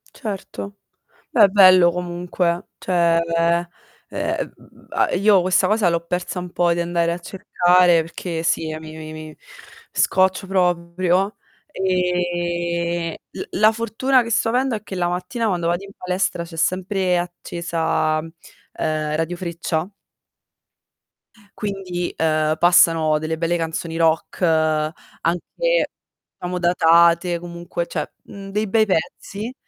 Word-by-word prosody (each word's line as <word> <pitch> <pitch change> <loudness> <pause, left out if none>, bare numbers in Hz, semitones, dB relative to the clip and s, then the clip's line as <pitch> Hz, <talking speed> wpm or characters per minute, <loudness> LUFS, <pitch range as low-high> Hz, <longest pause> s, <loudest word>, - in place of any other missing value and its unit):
Certo, 200 -2 -6 0.5
beh, 210 -4 +6
bello 185 -3 +7
comunque, 175 0 -2
cioè 170 -2 +2 0.2
ehm 170 +1 +2 0.4
m - - -7
m - - -5 0.2
m - - -1
io 200 0 +5
questa 185 +1 +2
cosa 210 -4 +2
l'ho 170 0 -1
persa 180 +2 -3
un 180 0 -7
po', 175 -1 +2
di 170 - -3
andare 170 0 0
a - - -4
cercare, 175 -1 +3
perché 165 0 -5
sì 165 -1 0
eh 155 - -5
mi 155 0 -10
mi 155 0 -8
mi 155 -1 -9 0.6
scoccio 190 +1 +2
proprio, 180 +1 +1 0.3
e 175 - -1
l - - -9
la - - -5
la 215 +1 +6
fortuna 230 +4 +1
che 230 - -5
sto 225 0 +1
avendo 250 +1 +1
è 210 - -6
che 200 - -9
la 175 -1 0
mattina 180 +7 -2
quando 175 -4 0
vado 175 +3 -1
in 195 - -12
palestra, 180 -1 -1
c'è 165 -1 -11
sempre 185 +1 0
accesa, 170 -2 -1
ehm, 160 +1 -9 0.8
Radio 165 +2 -1
Freccia 170 0 -3 1.7
quindi, 190 -4 -4
ehm, 155 -1 +1
passano 165 -3 +4
delle 160 +1 -3
belle 170 +1 0
canzoni 165 0 -3
rock, 165 +1 +1
anche 165 - 0 0.5
diciamo 180 0 -3
datate, 170 0 +4
comunque 170 0 -5
cioè, - - -4
mhmm, 195 -1 -10
dei 210 +2 -1
bei 220 +2 +3
pezzi, 200 +5 -3
175 Hz, 135 wpm, -21 LUFS, 170-190 Hz, 1.7 s, bello